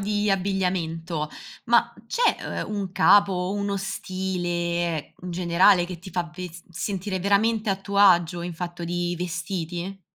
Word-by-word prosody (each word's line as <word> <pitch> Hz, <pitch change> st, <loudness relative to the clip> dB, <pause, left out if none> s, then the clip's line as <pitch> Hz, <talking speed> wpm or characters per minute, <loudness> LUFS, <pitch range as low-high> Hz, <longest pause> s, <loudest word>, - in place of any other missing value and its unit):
di 205 Hz, 0 st, 0 dB
abbigliamento, 180 Hz, -5 st, -1 dB, 0.4 s
ma -, -, +3 dB
c'è, 475 Hz, 0 st, 0 dB
uhm, 210 Hz, -, -5 dB
un 200 Hz, -2 st, -3 dB
capo 200 Hz, +1 st, +5 dB
o 180 Hz, +1 st, -1 dB
uno 200 Hz, 0 st, -1 dB
stile 175 Hz, -4 st, -2 dB
in 180 Hz, -, -4 dB
generale 175 Hz, +1 st, +4 dB
che 175 Hz, 0 st, -7 dB
ti 180 Hz, -, -11 dB
fa 170 Hz, -2 st, -2 dB
ves 180 Hz, -2 st, -7 dB
sentire 190 Hz, +2 st, -3 dB
veramente 215 Hz, +3 st, +2 dB
a 195 Hz, -, +2 dB
tuo 200 Hz, +1 st, -3 dB
agio 175 Hz, -4 st, +5 dB
in 175 Hz, 0 st, -5 dB
fatto 175 Hz, 0 st, -5 dB
di 175 Hz, +1 st, -1 dB
vestiti? 175 Hz, +1 st, -4 dB
180 Hz, 150 wpm, -25 LUFS, 175-195 Hz, 0.4 s, capo